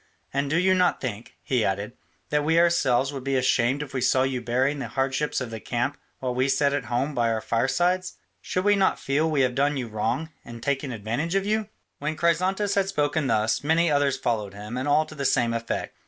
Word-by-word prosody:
And 140 0 0
do 160 - +1
you 185 +2 +4
not 180 -1 +2
think," 115 -3 -6
he 125 -4 +1
added, 100 +4 -2 0.4
"that 150 0 +2
we 160 +2 +2
ourselves 145 -6 +3
would 135 -2 -6
be 135 0 -1
ashamed 130 +2 +2
if 135 - -11
we 130 - -1
saw 130 +1 +3
you 130 -2 -1
bearing 130 +5 0
the - - -4
hardships 135 +2 -1
of 125 -3 -5
the 110 - -5
camp - - -2 0.2
while 130 -1 -3
we 130 +2 +1
sat 140 +1 +2
at 140 -4 -2
home 125 +5 -1
by 120 -3 +1
our 115 - +1
own 110 - -3
firesides? 175 +10 +1 0.3
Should 185 - -2
we 205 0 +5
not 195 -1 +2
feel 150 +4 +1
we 150 -3 +2
had 130 -1 +2
done 145 +2 +1
you 125 -3 -3
wrong, 115 +8 -2
and 115 -1 -10
taken 140 -1 -1
advantage 120 - -2
of 195 0 +1
you?" 215 0 0 0.3
When 150 +2 -2
Chrysantas 185 +4 +1
had 195 -1 +1
spoken 150 -5 0
thus, 110 0 +1
many 160 +2 +3
others 145 -2 +2
followed 105 -4 -2
him, 105 +3 -7
and 130 +2 -2
all 150 +2 +3
to - - -12
the 140 -2 -5
same 120 -3 +2
effect. 115 0 -3
135 Hz, 230 wpm, -25 LUFS, 120-155 Hz, 0.4 s, we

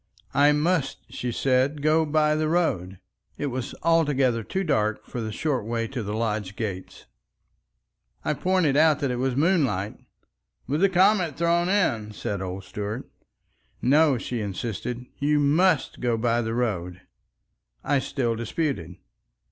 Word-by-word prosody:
I 145 +1 +5
must, 150 +1 -1
she 125 - -3
said, 135 +4 +1
go 155 +1 +3
by 150 0 +3
the 155 0 0
road. 95 - 0 0.4
It 145 - -3
was 125 0 -4
altogether 140 -8 +2
too 190 - -2
dark 110 - 0
for 120 - -5
the 110 -1 -4
short 135 +2 -1
way 115 +1 -2
to 130 -3 -4
the 105 0 -4
lodge 105 -3 -2
gates. 95 -5 -6 1.2
I 150 - +1
pointed 180 -4 +1
out 155 0 +4
that 140 -3 0
it 125 - -2
was 130 0 0
moonlight. 135 - +1 0.7
"With 145 +6 -1
the 195 - +5
comet 185 -4 +3
thrown 170 +2 +2
in," 115 - +1
said 100 -1 -4
old 95 0 -5
Stuart. 105 +5 -5 0.7
"No," 145 +1 +4
she 120 0 -4
insisted, 115 +4 -4
"you 150 +1 +2
must 155 +2 +2
go 120 -2 0
by 120 +1 +1
the 115 0 -2
road." 90 -7 -2 0.8
I 145 -1 +2
still 125 -3 -1
disputed. 115 - -3
130 Hz, 150 wpm, -25 LUFS, 110-155 Hz, 1.2 s, I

